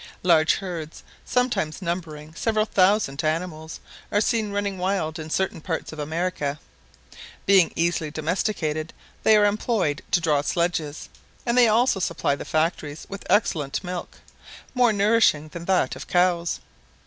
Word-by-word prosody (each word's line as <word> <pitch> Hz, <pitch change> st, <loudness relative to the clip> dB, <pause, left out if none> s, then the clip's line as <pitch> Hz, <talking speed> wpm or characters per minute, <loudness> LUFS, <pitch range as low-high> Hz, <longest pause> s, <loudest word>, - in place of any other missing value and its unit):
Large 160 Hz, -3 st, +4 dB
herds, 170 Hz, -5 st, -6 dB, 0.2 s
sometimes 250 Hz, -11 st, 0 dB
numbering 165 Hz, -4 st, -5 dB
several 215 Hz, +4 st, 0 dB
thousand 190 Hz, -8 st, +2 dB
animals, 160 Hz, 0 st, -3 dB, 0.3 s
are 205 Hz, -, +3 dB
seen 220 Hz, -2 st, 0 dB
running 200 Hz, -2 st, -2 dB
wild 180 Hz, -4 st, -1 dB
in 155 Hz, 0 st, -7 dB
certain 190 Hz, -1 st, -1 dB
parts 160 Hz, -1 st, -4 dB
of 155 Hz, -, -9 dB
America. 155 Hz, -2 st, -2 dB, 0.9 s
Being 190 Hz, -3 st, +5 dB
easily 165 Hz, -2 st, 0 dB
domesticated, 155 Hz, 0 st, -2 dB, 0.3 s
they 220 Hz, -1 st, +5 dB
are 205 Hz, -, +5 dB
employed 205 Hz, -7 st, 0 dB
to -, -, +3 dB
draw 155 Hz, -4 st, +2 dB
sledges; 160 Hz, -1 st, -2 dB, 0.4 s
and 235 Hz, -1 st, +1 dB
they 245 Hz, -1 st, +6 dB
also 225 Hz, -1 st, +3 dB
supply 140 Hz, -5 st, 0 dB
the -, -, -8 dB
factories 155 Hz, -1 st, -1 dB
with 200 Hz, 0 st, -8 dB
excellent 155 Hz, -9 st, +1 dB
milk, 180 Hz, -1 st, -6 dB, 0.6 s
more 250 Hz, -3 st, +4 dB
nourishing 205 Hz, -7 st, +3 dB
than 170 Hz, +1 st, -8 dB
that 190 Hz, -1 st, +1 dB
of -, -, -9 dB
cows. 175 Hz, -2 st, +1 dB
175 Hz, 140 wpm, -24 LUFS, 155-200 Hz, 0.9 s, they